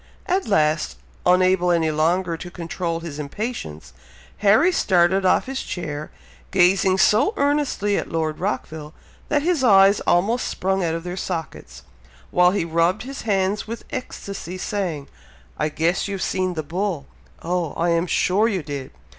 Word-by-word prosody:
At 375 +2 0
last, 155 - +1 0.3
unable 185 0 +4
any 165 -2 +2
longer 165 +3 +1
to 175 +2 -8
control 170 -1 -4
his 155 -3 -7
impatience, 145 - -5 0.4
Harry 220 - +4
started 190 - +3
off - - +3
his 265 0 -4
chair, 155 -4 -5 0.4
gazing 190 0 +3
so 215 - +3
earnestly 280 -8 +1
at - - -3
Lord 160 -1 -2
Rockville, 160 -5 -4 0.3
that 290 -1 +1
his 335 -5 +1
eyes 195 -3 +6
almost 205 +8 +2
sprung 190 0 -1
out 165 -1 0
of 165 - -5
their 180 0 -5
sockets, 170 -4 -6 0.5
while 180 0 +5
he 185 -2 -1
rubbed 170 +5 +1
his 270 +2 -7
hands 195 +1 0
with 230 +1 -7
ecstacy, 200 -7 -6
saying, 180 -8 -3 0.5
"I - - +1
guess 165 +6 0
you've 195 -2 -3
seen 185 -1 -1
the 155 - -3
bull? 170 -1 -3 0.4
Oh! 175 -2 -1
I 170 +1 0
am 170 +1 +1
sure 185 +6 +2
you 190 -7 -1
did! 140 -3 -6
180 Hz, 155 wpm, -22 LUFS, 165-200 Hz, 0.5 s, eyes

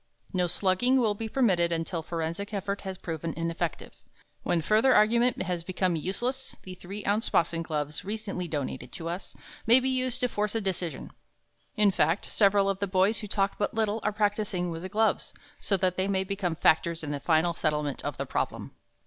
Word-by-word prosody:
No 180 -1 +2
slugging 195 +9 +2
will 220 -4 +2
be 220 +2 -5
permitted 185 -10 +2
until 165 +1 -2
forensic 170 +5 -4
effort 200 0 -2
has 190 -1 -5
proven 165 -1 -4
ineffective. 165 0 -3 0.5
When 175 - +1
further 215 +10 +4
argument 235 +3 +3
has 180 -2 -3
become 185 0 0
useless, 240 - -3
the 185 - -8
three 195 +3 -8
ounce 205 +3 +1
boxing 165 0 +1
gloves, 150 -2 -3
recently 200 -3 -4
donated 130 -5 -4
to 165 - -5
us, 175 +3 -5 0.3
may 240 +3 +8
be 260 +1 0
used 255 -1 0
to 250 - +3
force 210 -2 -2
a - - +2
decision. 180 -6 -3 0.7
In 210 -1 +5
fact, 165 +1 +1
several 200 -1 +3
of 195 -1 0
the 200 - -1
boys 190 +3 +3
who 210 - -5
talk 195 0 0
but 205 +2 -1
little, 220 -1 +1
are 210 - 0
practising 205 -4 0
with 165 0 -5
the 185 - -6
gloves, 220 +2 0 0.2
so 200 - +1
that 185 -1 0
they 190 +1 +1
may 190 -1 +1
become 190 -3 -2
factors 165 +1 +2
in 145 - -3
the 145 - -2
final 160 +3 +2
settlement 150 -3 -1
of - - -3
the - - -2
problem. - - -3
190 Hz, 190 wpm, -28 LUFS, 170-210 Hz, 0.7 s, may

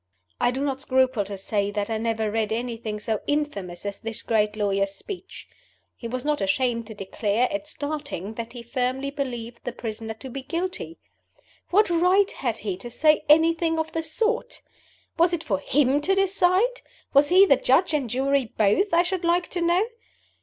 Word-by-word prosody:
I - - +3
do 260 +2 -3
not 270 -2 -1
scruple 260 -5 +2
to 200 0 -4
say 200 +1 -1
that 205 +1 -3
I 220 - -1
never 220 -1 -1
read 220 -1 -1
anything 225 -2 -3
so 215 0 -2
infamous 205 -13 -2
as 200 -1 -4
this 225 0 -6
great 210 -2 +1
lawyer's 200 -1 0
speech. 380 - -9 0.5
He 235 - -7
was 255 +3 -4
not 300 0 0
ashamed 230 +3 0
to 220 - -9
declare, 205 +4 0
at 300 0 -3
starting, 285 - -5
that 230 +1 -6
he 240 -2 -8
firmly 255 +3 -2
believed 240 -4 -5
the 245 - -3
prisoner 225 -1 -6
to 265 - -10
be 275 - -5
guilty. 335 +3 -4 0.7
What 420 +4 +4
right 365 +4 +4
had 235 -4 -2
he 200 -5 -4
to 240 +5 -9
say 305 +5 +3
anything 325 +1 +4
of 320 0 -2
the 325 - -2
sort? 450 +10 -2 0.6
Was 345 +1 +4
it 330 -2 -1
for 195 -4 -1
him 280 +5 +2
to 385 +6 +2
decide? 390 +5 +2 0.3
Was 285 +1 +5
he 375 +3 +7
the 280 - +5
Judge 320 +8 +3
and 275 -6 0
Jury 270 +2 +1
both, 225 - +3
I 345 - +5
should 365 0 -2
like 345 +1 +1
to 350 - -2
know? 345 +4 +3
260 Hz, 185 wpm, -25 LUFS, 220-330 Hz, 0.7 s, he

